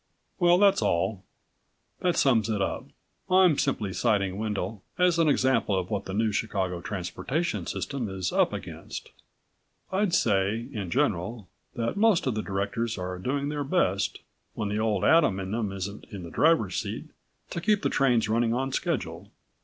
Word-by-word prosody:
"Well, 175 -1 +5
that's 200 - +4
all. 95 0 0 0.8
That 180 -1 +1
sums 115 -5 +3
it 105 -2 0
up. 95 - -2 0.4
I'm 185 -5 +5
simply 105 -8 -1
citing 100 -4 +1
Wendel 105 -1 -3 0.2
as 180 -2 +3
an 165 - +4
example 130 -7 +2
of 90 -1 -3
what - - -2
the 95 - -5
New 110 0 +2
Chicago 95 -4 -2
Transportation 125 - -3
System 130 -6 -3
is 95 -2 -3
up - - +3
against. - - -7 0.8
I'd 190 -2 +1
say, 105 - +1
in 100 -5 -4
general, 110 -4 -1 0.3
that 115 +8 -2
most 215 -4 +4
of 130 - +1
the 110 - -2
directors 105 +4 -2
are 90 0 -4
doing 140 +8 -1
their 145 -1 -2
best, 135 - 0 0.3
when 105 - -2
the 105 +1 -1
Old 110 -3 +1
Adam 150 - +4
in 95 0 -4
them 110 -3 -1
isn't 100 +1 -6
in 100 -5 -8
the 85 - -8
driver's 155 - +3
seat, - - -4 0.5
to 170 - -3
keep 210 +2 +2
the - - +2
trains 125 -5 +3
running 115 +1 +1
on 135 +2 -1
schedule." 100 - -2
110 Hz, 170 wpm, -27 LUFS, 95-145 Hz, 0.8 s, Well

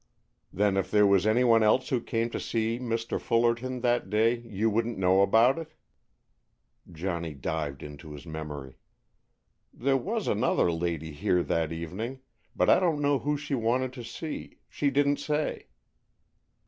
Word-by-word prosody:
"Then 100 0 +1
if 95 - -1
there 105 -1 +4
was 100 0 +4
anyone 115 0 +4
else 110 +4 +3
who 125 -3 0
came 115 0 -2
to - - -3
see 115 +1 -1
Mr. 115 -2 -2
Fullerton 120 +2 +1
that 120 -5 +1
day, 115 +3 +2
you 110 -2 -2
wouldn't 115 +2 0
know 95 0 +4
about 115 +8 +4
it?" 160 -1 -9 1.2
Johnny 85 -2 -4
dived 70 0 -4
into 75 +1 -10
his 70 -1 -10
memory. 75 -4 -7 0.9
"There 135 +2 +1
was 210 - -3
another 105 -5 +2
lady 80 -2 -3
here 85 +4 +1
that 80 -1 -1
evening, 95 +11 -5 0.3
but - - +2
I - - +6
don't 170 -5 +1
know 145 -1 +2
who 150 0 -1
she 145 0 -5
wanted 125 +1 0
to 125 -2 -8
see. 145 +7 -7
She 145 - 0
didn't 140 +1 +2
say." 150 0 -2
115 Hz, 155 wpm, -28 LUFS, 90-130 Hz, 1.2 s, I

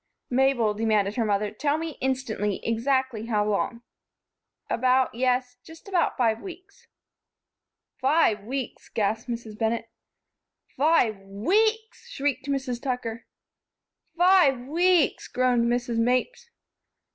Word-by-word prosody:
"Mabel," 250 -4 +2
demanded 210 -2 +1
her 230 - 0
mother, 205 0 0
"tell 285 +6 0
me, 325 0 -4
instantly, 250 -6 -1
exactly 235 -1 0
how 210 -2 +1
long?" 230 +3 -1 0.8
"About 255 +1 +2
yes, 250 +1 0
just 325 +4 -15
about 370 -3 0
five 225 -3 +1
weeks." 390 +6 -12 1.1
"Five 260 -7 +2
weeks!" 260 +3 -5
gasped 220 +2 -1
Mrs. 230 -3 -6
Bennett. 225 0 -1 0.8
"Five 270 -9 +2
weeks!" 410 - -1
shrieked 285 0 -2
Mrs. 265 -3 -2
Tucker. 235 -3 -4 0.9
"Five 350 -8 +5
weeks!" 335 +5 +2
groaned 250 -2 +1
Mrs. 240 -1 -1
Mapes. 255 - 0
250 Hz, 110 wpm, -25 LUFS, 225-285 Hz, 1.1 s, Five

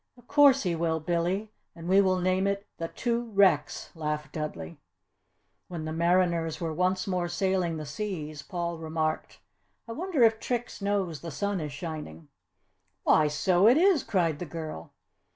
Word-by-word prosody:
"Of 245 - -19
course 280 -1 +5
he 180 -3 0
will, 165 -1 0
Billy, 175 +6 -1 0.2
and 165 0 -9
we 190 +2 +5
will 185 -1 +2
name 185 +1 +1
it 200 0 -2
'The 165 - -2
Two 240 -1 -1
Wrecks,'" 190 -7 +2
laughed 150 -1 -3
Dudley. 85 - -6 0.9
When 170 -3 -6
the 155 - -4
mariners 170 -1 +1
were 165 -2 -3
once 185 +3 0
more 180 -2 -1
sailing 175 -2 0
the 155 - -5
seas, 155 -4 -5
Paul 170 0 -4
remarked, 155 -1 -3 0.5
"I - - -6
wonder 320 0 0
if 225 -1 +4
Trix 240 -3 -3
knows 195 -6 -1
the 170 - -6
sun 200 +5 -2
is 150 -1 -4
shining!" 155 +1 -7 0.7
"Why, 155 - +4
so 175 +6 +3
it 245 +5 +6
is!" 360 -3 +4
cried 165 -7 0
the 180 - -4
girl. 155 - -7
175 Hz, 165 wpm, -28 LUFS, 160-200 Hz, 0.9 s, it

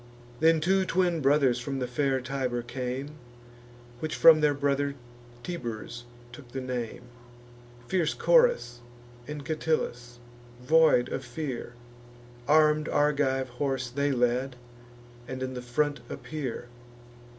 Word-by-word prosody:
Then 160 0 +4
two 190 +4 +3
twin 180 -3 +1
brothers 135 -3 +3
from 135 +2 -4
fair 135 +2 0
Tibur 130 -2 -2
came, 130 +4 -5 0.8
(Which 155 -1 -3
from 160 -2 +7
their 150 -1 +3
brother 140 0 0 0.5
Tiburs 120 -7 -6 0.3
took 120 0 -13
the 135 - -3
name,) 125 -3 -4 0.8
Fierce 170 -1 0
Coras 485 - +3 0.5
and 150 -2 -6
Catillus, 125 -6 -2 0.4
void 150 -2 +4
of - - -4
fear: 125 -2 -5 0.7
Arm'd 155 0 +4
Argive 140 -3 +1
horse 135 -3 -1
they 140 +2 0
led, 125 +1 0 0.7
and 130 +1 -5
in 130 0 -4
the 125 - -5
front 145 +4 -1
appear. 135 -6 -5
140 Hz, 115 wpm, -28 LUFS, 125-155 Hz, 0.8 s, from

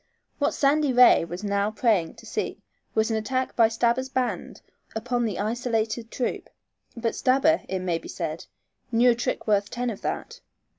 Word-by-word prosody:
What 285 - +1
Sandy 290 0 +3
Ray 250 -8 +6
was 175 +4 -7
now 200 0 +1
praying 215 -6 +1
to - - -14
see - - -3 0.4
was 220 +1 +2
an 220 - +1
attack 255 +4 -2
by 230 -2 +6
Stabber's 235 +3 0
band 255 -1 -3 0.3
upon 240 +2 -1
the 210 -4 -2
isolated 225 +1 -1
troop, 245 - -3 0.5
but 230 -1 -1
Stabber, 275 +5 +3
it 190 - -1
may 175 -3 -1
be - - -11
said, 165 -2 -5 0.4
knew 240 +2 +5
a - - +4
trick 245 +2 -2
worth 205 -1 +2
ten 245 0 -2
of 205 - -8
that. - - -4
230 Hz, 170 wpm, -25 LUFS, 210-250 Hz, 0.5 s, Ray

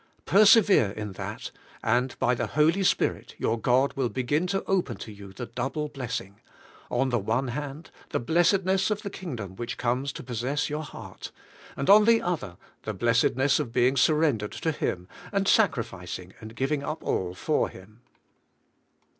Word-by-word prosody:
Persevere 205 - +6
in 105 +1 -6
that, 95 - -6 0.3
and 125 +3 +1
by 125 -1 +2
the 120 - -2
Holy 155 +6 +2
Spirit 190 - 0
your 115 +1 0
God 130 +4 +3
will 130 -3 -1
begin 145 +8 0
to 195 +1 -1
open 175 - 0
to 105 +1 -9
3^ou 100 -1 -12
the 120 - -5
double 135 +6 -3
blessing: 115 -8 -5 0.5
on 135 - +1
the 120 -2 +1
one 115 +6 -1
hand, 145 +4 -6 0.2
the - - -1
blessedness 185 - +2
of 210 -1 -2
the 200 - -5
Kingdom 115 - -6
which 120 - -5
comes 125 +3 -1
to - - -8
possess 125 +4 -2
your 150 +1 -2
heart; 150 - -9 0.5
and 140 - -2
on 210 +1 +8
the 230 0 +5
other 175 - -2
hand, 85 -1 -15 0.2
the 110 - -5
blessed 115 +4 +2
ness 135 +3 +2
of 135 -6 -3
being 125 +3 +3
surrendered 140 -6 +2
to 160 - -1
Him, 90 - -3 0.2
and 195 -1 0
sacrificing 95 - 0
and 110 0 -10
giving 135 +3 0
up 155 +3 -5
all 90 -1 -1
for - - 0
Him. 105 +5 -15
130 Hz, 170 wpm, -27 LUFS, 115-160 Hz, 0.5 s, on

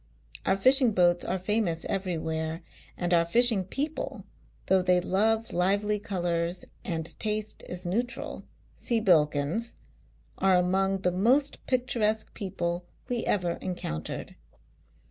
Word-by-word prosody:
Our 190 - +3
fishing 255 +2 +6
boats 175 -2 +3
are 185 - -1
famous 185 -3 -1
everywhere; 165 -3 -3 0.3
and 175 0 -1
our 170 -1 +5
fishing 225 +3 +5
people, 290 - -4 0.4
though 190 0 +3
they 180 0 +3
love 220 +5 +1
lively 200 +4 +1
colours 175 -3 -2 0.2
and 165 -3 -3
taste 215 0 -2
is 180 +1 -7
neutral 235 +7 -3 0.3
(see 235 -3 -1
Bilkins), 165 +2 +1 0.6
are 190 -1 +4
among 190 +2 +1
the 180 - +1
most 250 +10 +2
pic 255 -1 +1
turesque 220 -3 0
people 175 -2 -4 0.2
we 240 -2 -1
ever 175 -4 0
encountered. 80 - -5
190 Hz, 125 wpm, -28 LUFS, 175-220 Hz, 0.6 s, fishing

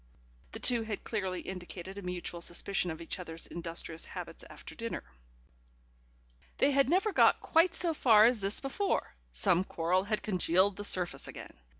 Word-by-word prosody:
The - - -6
two 240 -2 +2
had 220 -2 -5
clearly 190 -5 -3
indicated 185 0 -7
a 200 - -6
mutual 180 -1 -5
suspicion 180 +2 0
of 160 0 -6
each 165 - -5
other's 165 -2 -7
industrious 165 -1 -5
habits - - -8
after - - -11
dinner.... 230 0 -5 1.5
They 285 - +4
had 275 -1 +3
never 385 +5 +2
got - - +5
quite 330 +2 +3
so 340 -2 +1
far 220 -7 +6
as 240 -1 +3
this 195 +2 +2
before: 375 +9 -1 0.2
some 115 - +2
quarrel 180 +1 0
had 215 0 -1
congealed 185 0 +2
the 205 - -5
surface 180 -3 0
again. - - -9
195 Hz, 165 wpm, -31 LUFS, 175-230 Hz, 1.5 s, far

